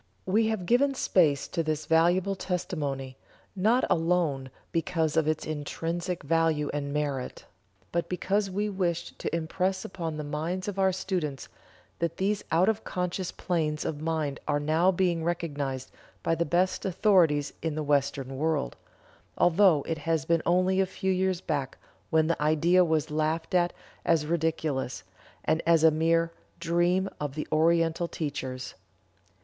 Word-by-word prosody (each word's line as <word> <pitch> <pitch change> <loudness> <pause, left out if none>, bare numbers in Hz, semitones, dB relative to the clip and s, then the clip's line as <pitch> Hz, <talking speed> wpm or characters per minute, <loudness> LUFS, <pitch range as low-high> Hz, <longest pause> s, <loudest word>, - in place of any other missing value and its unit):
We 220 +4 +2
have 220 -5 -2
given 270 +7 +3
space 155 - +2
to 170 - -1
this 155 -1 -2
valuable 175 +5 +3
testimony, 145 -8 -3 0.4
not 220 +7 +3
alone 165 -6 +1 0.2
because 165 -1 0
of 160 -2 +2
its 155 0 0
intrinsic 165 +3 -3
value 160 -1 +1
and 145 -1 -3
merit, 140 -3 -3 0.5
but 170 0 -1
because 195 +3 0
we 205 +3 -1
wished 175 -4 -2
to - - -2
impress 185 +3 -1
upon 165 -4 -4
the 150 - -4
minds 160 +6 -3
of 200 -1 -3
our 190 0 +4
students 180 -7 -3 0.5
that 170 -1 -1
these 200 +2 0
out 170 +4 +4
of 220 0 +1
conscious 180 0 -3
planes 155 -4 -1
of 150 -1 -3
mind 155 -3 -1
are 145 -1 +1
now 160 +5 +3
being 175 -3 +1
recognized 145 -6 -3 0.3
by - - +1
the 170 +1 0
best 180 +4 +1
authorities 175 -6 +3
in 160 -2 -2
the 155 - -2
Western 140 -2 0
world, 155 - 0 0.6
although 175 -4 +4
it 160 -1 -2
has 160 -1 0
been 165 -1 +2
only 185 +2 +3
a 190 - +1
few 190 +1 -2
years 185 -1 0
back 140 -6 -3 0.3
when 160 -1 +3
the 165 -1 -1
idea 160 +4 +4
was 160 -2 0
laughed 155 +2 -1
at 175 -1 +3 0.3
as 165 -3 +2
ridiculous, 155 - -1 0.4
and 160 +1 +2
as 165 -2 +5
a 160 - +7
mere 165 +1 +2 0.3
"dream 175 +3 +2
of 145 -2 -4
the 155 - -4
Oriental 165 +1 +2
teachers." 130 -6 -4
165 Hz, 155 wpm, -28 LUFS, 150-180 Hz, 0.6 s, a